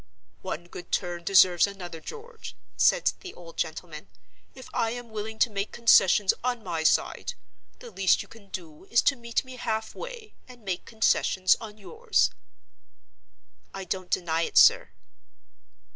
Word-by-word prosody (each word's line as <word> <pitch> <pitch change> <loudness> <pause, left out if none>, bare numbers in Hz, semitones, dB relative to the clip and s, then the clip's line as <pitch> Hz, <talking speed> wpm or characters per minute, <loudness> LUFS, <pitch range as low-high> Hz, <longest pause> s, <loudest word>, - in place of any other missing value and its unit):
"One 170 +3 -5
good 175 0 -11
turn 175 -2 -2
deserves 185 0 +5
another, 175 -5 -8
George," 460 - -10 0.2
said - - +3
the 370 - -10
old 170 -1 -13
gentleman. 160 - -5 0.5
"If 260 - -11
I 225 - +1
am 240 0 -7
willing 220 +1 -5
to 235 - +2
make 200 0 -3
concessions 205 -4 +5
on 245 -2 -2
my 165 -5 -3
side, 160 - +1 0.4
the 480 -2 -12
least 190 -1 +2
you - - -18
can 210 -3 -17
do 165 -3 -9
is 235 +3 +2
to 280 - +3
meet 235 0 -2
me 260 -1 -10
half 220 -2 -3
way, 480 -4 -9
and 245 -4 -15
make 185 -2 -3
concessions 190 -4 +2
on 215 -2 -9
yours." 450 - 0 1.4
"I 195 - -5
don't 185 0 -4
deny 165 -2 0
it, - - -2
sir." - - +6
205 Hz, 155 wpm, -27 LUFS, 175-245 Hz, 1.4 s, sir